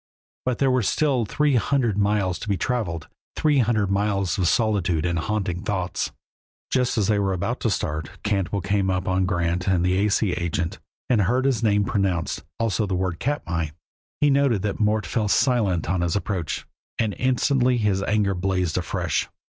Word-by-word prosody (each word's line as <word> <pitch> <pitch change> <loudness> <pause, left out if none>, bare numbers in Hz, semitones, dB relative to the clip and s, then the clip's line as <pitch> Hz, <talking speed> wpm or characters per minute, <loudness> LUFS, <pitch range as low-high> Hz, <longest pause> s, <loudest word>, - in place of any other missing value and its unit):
But 125 -2 0
there 135 -1 +2
were 130 0 +2
still 130 +2 +1
three 145 +4 +2
hundred 120 -2 +1
miles 100 -2 +1
to 110 - -6
be 100 - +1
traveled, 90 - -2 0.3
three 150 -3 +2
hundred 110 -5 +1
miles 100 -3 +1
of 90 - +2
solitude 95 -7 +1
and 85 -1 0
haunting 95 -1 -2
thoughts. 95 -4 -2 0.6
Just 125 -2 +1
as 105 - +2
they 105 0 +2
were 100 -1 +1
about 115 +7 -2
to 115 - 0
start, 80 -6 -2
Cantwell 100 -2 -1
came 100 0 +1
upon 95 0 0
Grant 85 -1 -1
and 90 -2 +2
the 95 +2 +2
A. 105 - +2
C. 100 -1 +1
agent, 85 -1 -2 0.3
and 120 -5 +3
heard 125 +7 +1
his 130 -6 +1
name 105 -3 +2
pronounced, 95 -5 -1 0.2
also 110 -2 0
the 95 - -1
word 90 -2 -2
"Katmai." 85 - -2 0.5
He 145 -1 +5
noted 135 -8 +2
that 105 -2 -2
Mort 105 -1 +1
fell 105 +5 -1
silent 105 - +2
at 90 +1 0
his 85 -2 0
approach, 95 -5 -2 0.3
and 110 -3 0
instantly 130 0 +2
his 105 -4 +1
anger 100 0 +1
blazed 90 -2 0
afresh. 85 - -1
100 Hz, 180 wpm, -24 LUFS, 90-115 Hz, 0.6 s, He